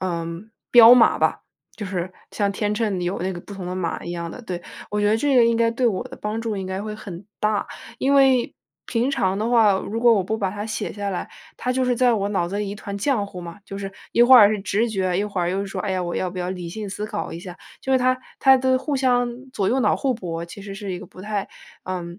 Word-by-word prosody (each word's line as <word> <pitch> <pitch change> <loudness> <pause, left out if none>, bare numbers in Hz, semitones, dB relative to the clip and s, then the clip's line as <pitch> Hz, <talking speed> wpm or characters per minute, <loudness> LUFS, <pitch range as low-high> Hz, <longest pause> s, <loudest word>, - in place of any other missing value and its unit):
嗯， 170 +2 -4 0.2
标 235 0 +10
码 245 - +5
吧。 - - +1 0.3
就 205 - -5
是 185 -1 -3 0.2
像 200 -1 0
天 210 +1 -1
秤 210 -4 -1
里 175 - -2
有 180 +3 -2
那 185 +2 -1
个 175 - -7
不 200 - -11
同 190 - -7
的 180 - -3
码 175 -3 -3
一 170 - -5
样 170 -1 -4
的， 250 - -9
对。 175 -5 -5 0.3
我 210 - -1
觉 205 - +2
得 215 - +3
这 275 +2 +2
个 240 - +7
应 230 0 +3
该 230 0 +3
对 240 +2 0
我 195 -5 0
的 - - -10
帮 210 +2 -3
助 225 -3 -3
应 190 -1 -4
该 190 +1 -3
会 215 0 -5
很 190 -3 -9 0.2
大。 215 -1 0 0.3
因 275 +1 +2
为， 265 -3 +4 0.3
平 235 +1 0
常 190 -6 0
的 220 +2 -1
话， 225 -5 +5
如 215 +4 -3
果 235 -1 +6
我 195 -4 +1
不 220 +3 -1
把 195 -3 0
它 205 +2 -5
写 220 - -3
下 200 -1 -3
来， 180 - -4 0.3
它 250 - -1
就 260 0 +1
是 250 - +2
在 245 0 +3
我 200 -2 -1
脑 175 -4 0
子 200 - -3
里 205 -1 -2
一 200 - -5
团 200 -1 -6
浆 220 -2 +1
糊 185 -2 -9
嘛。 170 +2 -9
就 195 -1 -7
是 195 0 -5 0.2
一 - - +2
会 255 +1 +9
儿 205 -2 +8
是 215 -2 -1
直 210 +4 0
觉， 185 -3 0
一 200 - +1
会 200 -3 -3
儿 175 0 0
又 195 +2 -1
说： 195 -1 -6
“哎 205 - -2
呀， 185 - -1
我 175 -1 -3
要 185 - -1
不 185 - -7
要 180 0 -2
理 180 -2 -5
性 210 +2 -6
思 210 +2 -4
考 210 - -4
一 165 - -6
下。” 180 0 -9 0.2
就 265 - -2
是 260 - +5
它 255 0 +2 0.2
它 265 -1 +7
的 260 0 +2
互 290 +1 -2
相 245 0 0
左 195 -5 0
右 260 - +2
脑 210 - +3
互 265 -2 0
博， 170 -6 -5
其 170 +4 -11
实 195 -1 -7
是 200 -1 -6
一 180 - -4
个 195 - -10
不 - - -14
太 210 -1 -3 0.4
嗯， 175 0 -5
205 Hz, 300 characters per minute, -23 LUFS, 185-235 Hz, 0.4 s, 标